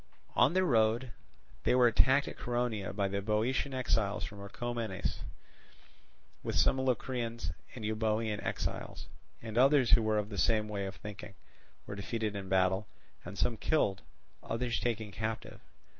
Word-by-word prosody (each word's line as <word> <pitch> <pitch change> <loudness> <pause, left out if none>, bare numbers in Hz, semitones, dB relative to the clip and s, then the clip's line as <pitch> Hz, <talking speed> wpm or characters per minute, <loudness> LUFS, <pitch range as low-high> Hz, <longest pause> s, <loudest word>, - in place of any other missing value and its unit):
On 145 - +5
their 185 0 +3
road 115 -2 +2 0.5
they - - +3
were 125 -1 +6
attacked 130 +4 +4
at - - -6
Coronea 120 -5 -1
by 100 0 0
the 100 +1 -2
Boeotian 110 +7 0
exiles 110 -5 0
from 100 -1 -7
Orchomenus, 110 0 -3 1.2
with - - -3
some 135 - +4
Locrians 120 - -1 0.2
and 115 -4 -5
Euboean 110 0 0
exiles, - - -4 0.4
and 115 0 -1
others 135 -2 +5
who 120 - +7
were 110 -1 +1
of 105 0 -1
the 100 - -5
same 110 -1 +3
way 100 -2 -3
of 95 - -6
thinking, 105 -1 -9 0.5
were - - -6
defeated 105 +1 -3
in 95 -2 -5
battle, 95 +2 +2 0.4
and 100 - -8
some 115 +5 +1
killed, 105 -11 +1 0.4
others 115 +1 -1
taken 110 -3 -2
captive. 110 +3 -4
110 Hz, 150 wpm, -32 LUFS, 100-120 Hz, 1.2 s, who